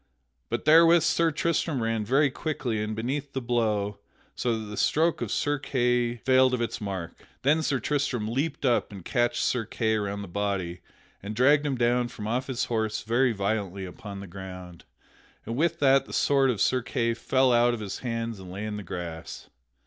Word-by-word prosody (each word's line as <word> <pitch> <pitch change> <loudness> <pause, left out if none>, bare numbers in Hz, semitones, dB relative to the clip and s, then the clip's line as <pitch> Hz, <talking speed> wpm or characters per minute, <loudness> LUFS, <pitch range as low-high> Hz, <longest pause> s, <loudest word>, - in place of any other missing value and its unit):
But - - -3
therewith 165 +1 +7
Sir 165 +1 +3
Tristram 155 -4 0
ran 115 -1 0
very 135 +6 +3
quickly 130 -7 -2
in 105 0 -3
beneath 135 +5 -3
the 135 - -1
blow, 110 -5 0 0.3
so 120 -2 -1
that 110 - -6
the 105 0 -7
stroke 160 +9 +2
of - - -3
Sir 145 0 0
Kay 125 -3 +1
failed 130 +1 +3
of - - -4
its 115 - -3
mark. 95 -5 -5 0.2
Then 150 +4 +3
Sir 140 -4 0
Tristram 135 -7 -1
leaped 140 +6 -2
up 120 -3 +2
and 95 -4 -10
catched 120 -1 +1
Sir 125 -3 +1
Kay 110 0 -1
around 100 -1 -2
the - - -8
body 90 -2 -2 0.4
and 105 +2 -6
dragged 145 +5 +4
him 135 - 0
down 120 0 +2
from 110 -3 -8
off 125 +4 -1
his 130 -1 -1
horse 110 -2 -1
very 120 +3 +2
violently 100 -2 -2
upon 100 +2 -8
the - - -7
ground, 90 -2 -9 0.6
and 115 - -4
with 165 +4 +1
that 135 -2 +4
the - - -10
sword 135 -2 +3
of 110 -6 -1
Sir 130 -1 +2
Kay 115 -1 -1
fell 130 +2 +2
down 120 0 +5
out 120 - +2
of - - -8
his 100 -2 -5
hands 115 -3 -3
and 95 -1 -10
lay 100 +3 -5
in 105 -1 -4
the 105 - -6
grass. 85 -3 -7
120 Hz, 200 wpm, -27 LUFS, 105-135 Hz, 0.6 s, therewith